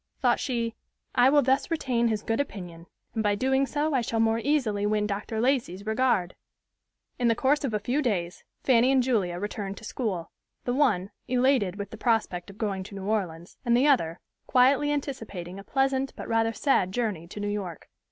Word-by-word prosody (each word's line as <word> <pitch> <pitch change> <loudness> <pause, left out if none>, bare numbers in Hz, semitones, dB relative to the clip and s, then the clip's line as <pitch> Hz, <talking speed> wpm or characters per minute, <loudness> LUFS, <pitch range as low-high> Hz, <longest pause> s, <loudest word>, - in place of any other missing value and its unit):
Thought - - +3
she, 235 -4 -1 0.4
"I 250 0 +5
will 290 +1 +5
thus 265 +2 +2
retain 250 -8 +1
his 215 -2 -1
good 225 +3 -1
opinion; 175 -10 -5 0.3
and 220 - -1
by 210 -1 +2
so - - -7
doing 265 +3 +2
I 295 -3 +2
shall 225 -1 -2
more 225 0 +3
easily 230 -7 +1
win 210 0 +1
Dr. 210 +2 -3
Lacey's 230 -7 0
regard." 220 -5 +1 0.8
In 245 - +2
the 230 - +3
course 285 +5 +2
of 270 - -1
a 210 - +1
few 250 +8 0
days 180 -9 -2 0.2
Fanny 250 0 +4
and 265 -2 +4
Julia 200 -9 0
returned 200 0 -4
to - - -11
school; 205 -7 -3 0.3
the 245 - -1
one, 220 -9 +2 0.2
elated 250 -7 +2
with 200 -1 -6
the 220 - -8
prospect 215 -6 0
of 200 - -12
going 200 -3 -2
to 200 - -10
New 195 -1 -6
Orleans, 180 -5 -2
and 235 0 +3
the 260 - +3
other, 180 - +2 0.3
quietly 270 +3 +4
anticipating 220 -11 -4
a - - -9
pleasant 270 +2 0
but - - -7
rather 225 0 +2
sad 225 -6 +1
journey 200 -7 -2
to 200 - -8
New 205 - -2
York. 195 -6 -4
225 Hz, 195 wpm, -27 LUFS, 200-260 Hz, 0.8 s, I